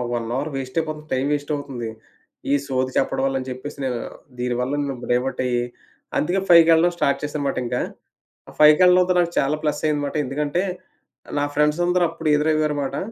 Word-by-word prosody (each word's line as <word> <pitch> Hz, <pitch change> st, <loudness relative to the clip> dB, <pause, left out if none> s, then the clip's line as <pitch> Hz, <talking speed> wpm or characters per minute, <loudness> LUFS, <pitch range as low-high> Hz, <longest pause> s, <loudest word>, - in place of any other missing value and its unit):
1 115 Hz, -1 st, -3 dB
hour 145 Hz, +3 st, -2 dB
వేస్టయిపోతుంది. 155 Hz, +3 st, -3 dB
Time 130 Hz, +1 st, 0 dB
వేస్టవుతుంది 145 Hz, -5 st, -4 dB, 0.6 s
ఈ -, -, +5 dB
సోది 130 Hz, -1 st, -1 dB
చెప్పడం -, -, +1 dB
వల్ల 135 Hz, 0 st, -1 dB
అని 130 Hz, -, -8 dB
చెప్పేసి, 130 Hz, +3 st, -7 dB
నేను 125 Hz, -2 st, -2 dB, 0.4 s
దీని 125 Hz, 0 st, -1 dB
వల్ల 125 Hz, +2 st, -1 dB
నేను 140 Hz, -2 st, -3 dB
బ్రేవౌట్ 125 Hz, +2 st, 0 dB
అయ్యి 120 Hz, -1 st, 0 dB, 0.6 s
అందుకే 180 Hz, +5 st, +1 dB
ఫైవ్‌కెళ్ళడం 170 Hz, 0 st, +6 dB
స్టార్ట్ 140 Hz, -4 st, +1 dB
చేశానుమాట 145 Hz, -1 st, -2 dB
ఇంకా. 125 Hz, +1 st, -1 dB, 0.7 s
ఆ -, -, -11 dB
ఫైవ్‌కెళ్లడంతో 180 Hz, +4 st, +6 dB
నాకు 170 Hz, -1 st, 0 dB
చాలా 140 Hz, +3 st, +1 dB
ప్లస్సయిందిమాట. 150 Hz, -1 st, -1 dB
ఎందుకంటే, 145 Hz, +6 st, -1 dB, 0.8 s
నా 145 Hz, -, +1 dB
ఫ్రెండ్సందరూ 175 Hz, +4 st, +2 dB
అప్పుడు 165 Hz, -1 st, -4 dB
ఎదురవ్వారుమాట. 150 Hz, -2 st, 0 dB
145 Hz, 145 wpm, -22 LUFS, 130-155 Hz, 0.8 s, ఫైవ్‌కెళ్ళడం